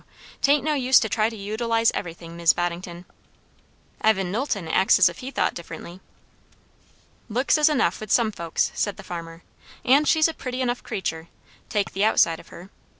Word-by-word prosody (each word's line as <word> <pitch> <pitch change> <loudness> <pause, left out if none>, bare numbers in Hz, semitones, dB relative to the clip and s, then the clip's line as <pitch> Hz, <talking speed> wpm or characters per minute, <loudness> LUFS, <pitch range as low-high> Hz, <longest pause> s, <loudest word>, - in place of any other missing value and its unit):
'Tain't 285 +1 +3
no 305 +1 0
use 260 -2 +4
to 220 - -1
try 215 0 +1
to 230 - -9
utilize 225 +3 0
everything, 165 -1 -7
Mis' 170 -1 +4
Boddington." 175 0 -4 1.0
"Evan 195 -4 +2
Knowlton 210 - -2
acts 190 +4 +4
as 185 -3 +6
if 170 - -11
he 255 - -6
thought - - 0
differently." 170 +1 -9 1.3
"Looks 250 +6 +1
is 305 0 +4
enough, 255 - +1
with 215 -2 -7
some 230 -3 +3
folks," 170 -5 -2
said 205 - -2
the - - -10
farmer; 165 -1 -8 0.4
"and 280 +4 +4
she's 315 -1 +4
a 325 - -4
pretty 255 -4 -6
enough 245 -1 -1
creatur', 170 -7 -4 0.4
take 205 -2 -1
the 195 - 0
outside 170 -6 +3
of - - -15
her. 180 +4 -13
210 Hz, 175 wpm, -24 LUFS, 175-250 Hz, 1.3 s, as